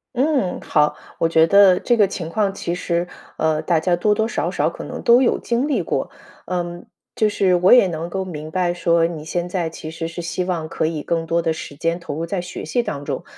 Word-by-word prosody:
嗯， 265 - +1
好。 150 -1 +1 0.2
我 165 - +2
觉 160 0 +4
得 200 -2 +6
这 240 - +2
个 210 -3 +5
情 170 -3 -5
况 195 +2 0
其 175 -3 -3
实， 175 0 -1 0.3
呃， 160 -1 +1
大 170 -3 +1
家 175 +1 +1
多 210 +4 +2
多 220 +1 0
少 - - -2
少 - - +1
可 - - -9
能 - - -6
都 240 +2 +5
有 245 - +2
经 245 +5 -1
历 290 - +1
过。 - - -2 0.4
嗯， 175 -1 -4 0.3
就 215 -1 +2
是 185 -3 +2
我 180 +2 +4
也 245 -6 +7
能 165 0 -4
够 190 +1 -3
明 155 -3 -7
白 180 -1 0
说， 170 -1 +2
你 160 -3 -7
现 175 +2 -3
在 175 -2 -2
其 160 -1 -8
实 165 0 -5
是 175 +1 -6
希 170 +2 -2
望 170 -3 -2
可 160 - -2
以 155 -2 -2
更 165 0 -1
多 170 +1 +1
的 165 -1 0
时 145 -2 -8
间 165 +1 0
投 170 - -7
入 160 +3 -3
在 180 +1 -2
学 180 - -7
习 240 +9 0
当 145 -10 -5
中， - - -3
175 Hz, 255 characters per minute, -21 LUFS, 165-195 Hz, 0.4 s, 也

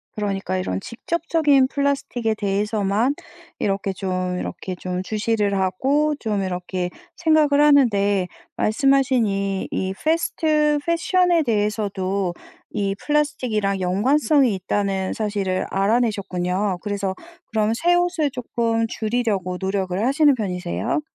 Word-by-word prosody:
그러니까 195 -3 -2
이런 95 - -2
직접적인 295 - +1
플라스틱에 275 -6 -1
대해서만 210 +4 0 0.4
이렇게 195 0 -1
좀 185 -1 -2
이렇게 185 - -5
좀 180 +1 -4
주시를 210 -1 0
하고 275 +11 +1
좀 210 -3 -1
이렇게 180 -1 -3 0.3
생각을 305 -3 +3
하는데 205 -10 +4 0.3
말씀하신 265 +1 +2
이 195 -1 -2
이 190 0 -2
패스트 310 -2 +1
패션에 340 0 +2
대해서도 200 -4 -1 0.4
이 195 -1 -1
플라스틱이랑 245 -10 0
연관성이 255 - +2
있다는 190 0 -1
사실을 200 -4 -1
알아내셨군요. 195 -3 0
그래서 200 -2 -2 0.4
그런 215 0 +1
새 345 +9 +2
옷을 350 -5 +1
쪼끔 230 -3 -1
줄이려고 215 -6 -1
노력을 190 0 -1
하시는 285 +2 +4
편이세요? 200 - -2
210 Hz, 300 characters per minute, -22 LUFS, 195-275 Hz, 0.4 s, 하는데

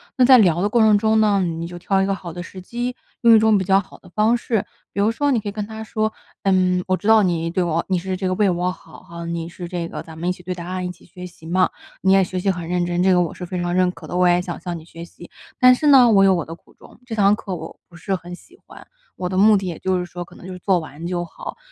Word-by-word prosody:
那 255 - +3
在 255 +1 +8
聊 175 -6 +3
的 205 - +1
过 235 - +2
程 220 -1 +5
中 220 +1 +2
呢， 205 -2 +3
你 165 -2 -3
就 175 0 -9
挑 190 +2 +1
一 - - +2
个 195 - 0
好 180 -3 -7
的 175 +2 -7
时 185 +1 -10
机， 240 +6 -4 0.3
用 235 -1 +7
一 - - +6
种 220 -1 +4
比 190 - -1
较 195 +1 +4
好 190 - -10
的 - - -19
方 215 +5 +2
式。 225 -4 -1 0.3
比 200 - -1
如 210 - +3
说 285 +5 0
你 245 - +2
可 210 - -5
以 - - -5
跟 210 0 -4
他 220 +1 -8
说： 215 0 -2 0.3
“嗯， 185 -1 +2
我 185 - +2
知 205 - -6
道 220 -1 +6
你 165 -3 0
对 180 +2 0
我 170 -1 0
你 185 - +2
是 185 +2 -3
这 185 0 -3
个 185 - 0
为 210 +1 +2
我 180 0 0
好 - - -14
哈， 170 0 -9
你 170 0 -4
是 175 0 -8
这 170 -1 -4
个 - - -6
咱 160 -1 -12
们 170 +2 -2
一 - - +2
起 180 0 -8
对 180 +1 -3
答 175 -1 -8
案、 185 0 -3
一 180 - -3
起 - - -17
学 180 +1 -11
习 170 -2 -13
嘛， 185 +2 +2 0.3
你 190 0 +4
也 195 0 +5
学 185 0 -4
习 195 - 0
很 175 -2 -6
认 180 0 0
真， 175 0 -1
这 190 +1 +4
个 180 - +4
我 170 - -2
是 - - -9
非 180 +1 -4
常 175 0 -2
认 185 0 +3
可 165 -2 -13
的， - - -6
我 180 0 +4
也 175 0 +4
想 175 -1 -6
向 175 0 -4
你 160 - -12
学 165 0 -10
习。 175 0 -13 0.3
但 255 0 +7
是 295 +4 0
呢， 260 -4 +7
我 195 -2 +5
有 195 -1 +5
我 170 - -2
的 165 - -8
苦 165 - -18
衷， - - -18
这 225 - -4
堂 205 -1 +4
课 205 -4 -6
我 170 - -9
不 175 - -17
是 190 +2 -2
很 175 0 -9
喜 345 - -20
欢。 - - -14 0.3
我 180 - -4
的 185 - -4
目 210 +2 +6
的， 195 - -4
也 170 -3 -4
就 190 -1 0
是 180 - -3
说， 175 0 -7
可 170 - -17
能 - - -13
就 185 - -7
是 180 - -9
做 190 +1 +2
完 160 0 -9
就 175 -1 -2
好。 - - -9
185 Hz, 340 characters per minute, -21 LUFS, 175-205 Hz, 0.3 s, 在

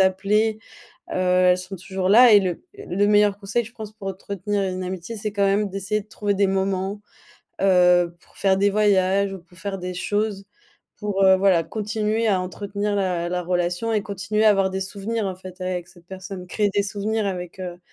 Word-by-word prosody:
appeler. 210 +4 +2 0.5
Heu, - - -4
elles 180 0 +3
sont 185 +2 -7
toujours 185 +1 -3
là 235 +4 +8
et 205 - +8
le 185 -3 -3
le 205 - -1
meilleur 205 -1 +4
conseil, 205 +4 -1
je 225 - -12
pense 220 -3 -8
pour 210 -2 -7
entretenir 200 +1 -3
une 185 0 -4
amitié, 185 +4 -5
c'est 210 0 -4
quand 200 -1 +1
même 200 +1 +1
d'essayer 195 +2 -2
de 205 - -28
trouver 205 -1 -1
des 200 0 +2
moments, 195 +1 -1 0.6
heu, 180 -2 +4
pour - - -24
faire 190 -1 +2
des 200 +1 +3
voyages 200 -1 +2
ou 190 - -7
pour 175 +1 -21
faire 195 0 -5
des 180 0 -5
choses. 205 +1 -2 0.5
Pour 205 -2 -1
heu, 190 0 +7
voilà 185 -3 +3
continuer 215 +3 -1
à 190 -3 +2
entretenir 200 +3 -3
la 180 -3 -1
la 180 0 -2
relation 180 +5 -1
et 215 - +2
continuer 205 +2 -1
à - - +8
avoir 195 -2 +2
des 190 0 -3
souvenirs 205 +3 -3
en 190 - -3
fait 185 0 -11
avec 180 -1 -3
cette 175 -1 -19
personne, 190 0 -8
créer 205 +3 0
des 200 +1 +1
souvenirs 210 +1 -2
avec, 180 -1 -5
heu, 175 -1 -6
195 Hz, 200 wpm, -23 LUFS, 185-205 Hz, 0.6 s, là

